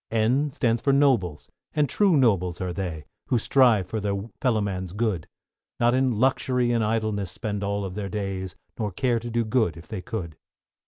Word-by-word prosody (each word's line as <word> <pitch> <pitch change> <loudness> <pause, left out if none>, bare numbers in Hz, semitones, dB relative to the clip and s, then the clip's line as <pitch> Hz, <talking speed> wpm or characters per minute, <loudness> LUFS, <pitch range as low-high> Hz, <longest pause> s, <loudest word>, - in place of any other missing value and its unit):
=N= 120 +7 +2
stands 120 -5 0
for 140 - +2
Nobles, 120 - +2 0.3
and 150 -1 +3
true 190 +3 +3
nobles 95 - +2
are 90 -1 -3
they, 85 -5 -4 0.2
Who 125 - +2
strive 115 -4 +4
for 110 +5 -3
their 100 -1 -1 0.2
fellow 125 -5 +2
man's 95 -3 -3
good; 105 -6 -1 0.5
Not 120 0 +4
in 130 -4 +1
luxury 125 -1 +2
and 115 -2 +2
idleness 110 -3 -1
spend 105 -2 -4
all 100 0 -1
their 100 +1 -5
days, 95 -2 -4 0.2
Nor 105 -2 -1
care 120 +4 +1
to 120 +1 -6
do 120 0 0
good 110 - +1
if 80 - -12
they 105 -4 -5
could. 90 -7 -5
110 Hz, 180 wpm, -25 LUFS, 95-120 Hz, 0.5 s, strive